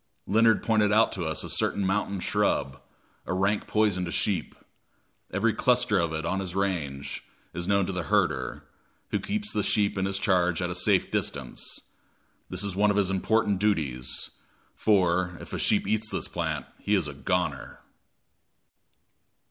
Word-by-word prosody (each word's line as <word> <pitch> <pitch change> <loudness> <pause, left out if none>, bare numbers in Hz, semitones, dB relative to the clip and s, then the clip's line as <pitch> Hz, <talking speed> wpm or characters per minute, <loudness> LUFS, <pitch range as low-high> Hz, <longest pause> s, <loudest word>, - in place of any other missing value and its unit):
Leonard 110 +2 +4
pointed 110 -2 +3
out 110 +2 +4
to 90 -3 -3
us 80 -1 -2
a - - -5
certain 100 - 0
mountain 100 0 0
shrub, 70 -5 0 0.5
a 90 - -1
rank 100 +2 +1
poison 105 -4 +2
to 85 - -3
sheep. 95 +1 -1 0.8
Every 110 +4 +1
cluster 125 -5 +2
of 85 -2 0
it 80 +1 -3
in 95 +3 0
his 95 -2 -5
range 80 -9 -2 0.3
is 90 0 -4
known 100 -1 +3
to 95 - -3
the 90 - -2
herder, 80 -11 0 0.5
who - - +1
keeps 210 +1 -3
the 105 - +1
sheep 100 0 +1
in 95 - 0
his 95 0 0
charge 90 -4 +2
at 90 -1 -1
a - - -2
safe 90 +1 +2
distance. - - -3 0.7
This 90 +1 -1
is 100 -3 -3
one 105 +2 +3
of 100 - +1
his 95 -2 +2
important 105 +1 +1
duties; 75 -12 -1 0.4
for, 90 -3 +2
if - - -10
a - - -2
sheep - - +2
eats 110 +1 0
of - - -1
this - - -2
plant, 80 -6 -3
he 105 - +1
is 90 -6 0
a 70 - -6
"goner." 80 -2 -2
95 Hz, 170 wpm, -27 LUFS, 85-105 Hz, 0.8 s, Leonard